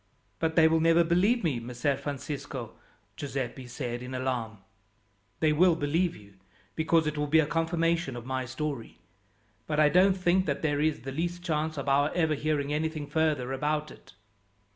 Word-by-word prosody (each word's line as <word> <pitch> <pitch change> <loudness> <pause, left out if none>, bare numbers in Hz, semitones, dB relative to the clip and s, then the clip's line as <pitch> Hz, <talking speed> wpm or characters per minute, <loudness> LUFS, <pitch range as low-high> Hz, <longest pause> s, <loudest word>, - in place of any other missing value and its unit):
"But 160 -1 0
they 160 -1 +7
will 160 0 +3
never 165 +1 +5
believe 190 +8 +2
me, 145 -8 0
Messer 125 +4 -1
Francisco," 140 -3 -5 0.4
Giuseppi 130 -1 -4
said 125 -1 -4
in 125 +1 -6
alarm. 125 -4 -2 0.8
"They 155 -1 +4
will 170 +2 +5
believe 165 +3 0
you, 100 -2 -16 0.4
because 160 0 +2
it 150 -1 -2
will 150 - 0
be 155 +2 +4
a 160 - +4
confirmation 165 -2 0
of 120 -1 -7
my 130 0 -2
story; 130 -1 -5 0.7
but 150 -1 0
I 150 -1 +6
don't 185 +3 +4
think 185 0 +2
that 140 +1 -2
there 145 -2 +1
is 155 -5 0
the 135 +2 -6
least 175 +4 -3
chance 155 -2 -1
of 140 - -4
our 145 +2 +3
ever 160 -3 +2
hearing 150 -1 -1
anything 155 0 -2
further 145 -4 0
about 150 +2 -1
it." - - -16
150 Hz, 175 wpm, -28 LUFS, 135-165 Hz, 0.8 s, they